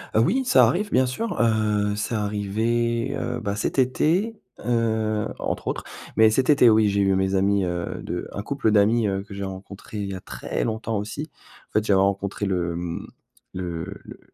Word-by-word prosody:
Heu, - - +5
oui, 260 - +2
ça - - +6
arrive 205 +4 -1
bien 130 0 +4
sûr. 225 - -3
Heu, 105 -2 +2
c'est 110 +2 -2
arrivé, 115 +4 0
heu, - - -3
bah, 100 0 -2
cet 105 - -2
été, 170 - +2 0.3
heu, 110 -3 +1
entre - - -3
autres. - - -2 0.3
Mais 110 0 +6
cet 130 +5 +1
été 140 -5 +7
oui, 110 -1 +4
j'ai 100 0 +1
eu 95 -1 +3
mes 95 0 +1
amis, 100 0 +2
heu, 85 -1 -3
de - - -4
un 100 - -4
couple 125 -1 0
d'amis, 110 +2 +4
heu, 95 0 -1
que 100 - -11
j'ai 100 - -4
rencontré 95 +2 -8
il 100 -1 -2
y - - -4
a - - -6
très - - -4
longtemps 110 -1 -2
aussi. 105 +1 -5 0.4
En - - -37
fait, 105 0 +2
j'avais 95 -3 +4
rencontré 100 +1 0
le, 90 -3 0
hem, 85 0 -5 0.5
le 85 -2 -4
le 100 +1 -9
le - - -11
105 Hz, 200 wpm, -24 LUFS, 100-115 Hz, 0.5 s, été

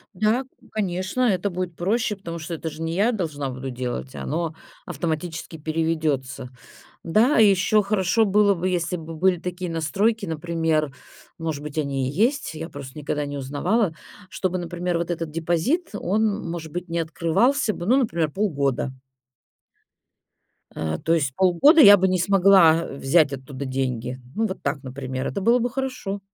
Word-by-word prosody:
Да, 215 +6 +2 0.3
конечно, 190 +2 -2
это 200 -5 +2
будет 180 -1 -4
проще, 210 +5 0
потому 170 -4 -7
что 165 +2 -5
это 160 0 -4
же 155 - -10
не 165 0 -2
я 210 +6 +3
должна 155 - -3
буду 130 +1 -6
делать, 125 +1 -5
оно 160 +1 -3 0.3
автоматически 160 0 -4
переведётся. 155 -5 -2 0.5
Да, 220 - +3
ещё 210 0 +5
хорошо 205 +2 +2
было 205 0 +4
бы, 180 +1 -2
если 180 0 -1
бы 165 0 -8
были 180 +2 +2
такие 180 0 -4
настройки, 200 +7 0
например, 160 -2 -1 0.5
может 160 -3 -3
быть, 150 +1 -6
они 135 -3 -1
и - - -8
есть, 240 - +1
я 160 +1 -6
просто 140 -1 -9
никогда 150 0 -2
не 145 0 -5
узнавала. 160 - 0 0.3
Чтобы, 185 -1 -2
например, 175 0 -2
вот 170 +1 -3
этот 165 -2 -3
депозит, 170 - 0
он, 205 -1 0
может 165 -2 -6
быть, 175 +3 -5
не 170 - -1
открывался 190 - +1
бы, 175 -2 -6
ну, 245 +6 +4
например, 170 - +1
полгода. 140 - -1 1.8
Э, 80 0 -2
то 165 - +2
есть 140 -5 0
полгода 190 - +6
я 205 -6 +10
бы 190 0 +2
не 185 -1 +1
смогла 180 -3 +5
взять 140 +2 +2
оттуда 135 +1 -6
деньги. 130 -1 -3 0.2
Ну, 225 - +1
вот 190 - -6
так, 140 -1 -2
например, 130 0 -4
это 200 - -3
было 235 +5 +4
бы 245 +1 0
хорошо. 255 -6 -4
170 Hz, 160 wpm, -23 LUFS, 150-200 Hz, 1.8 s, я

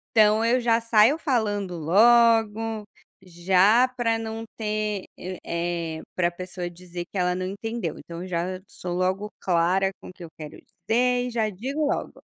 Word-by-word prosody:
Então 215 0 +5
eu 240 +2 +3
já 230 -1 +2
saio 230 +5 +4
falando 205 - -1
logo, 225 +4 +4 0.4
já 190 +6 +3
pra 230 -2 +1
não 225 0 -5
ter, 210 -2 -2
eh 185 0 -6 0.6
eh, - - -8
pra 175 -1 +1
pessoa 180 0 -6
dizer 175 0 -8
que 200 - -8
ela 180 -1 +1
não 185 0 -3
entendeu, 200 -2 -4
então 170 +1 -8
já 180 +1 -3
sou 180 -1 -6
logo 190 +3 -1
clara 185 +2 +2
com - - -10
o - - -12
que 180 - -12
eu 165 - -9
quero 155 -1 -9
dizer 245 +2 0
e - - -4
já 230 -2 0
digo 270 +10 -3
logo. - - -3
210 Hz, 165 wpm, -25 LUFS, 180-225 Hz, 0.6 s, Então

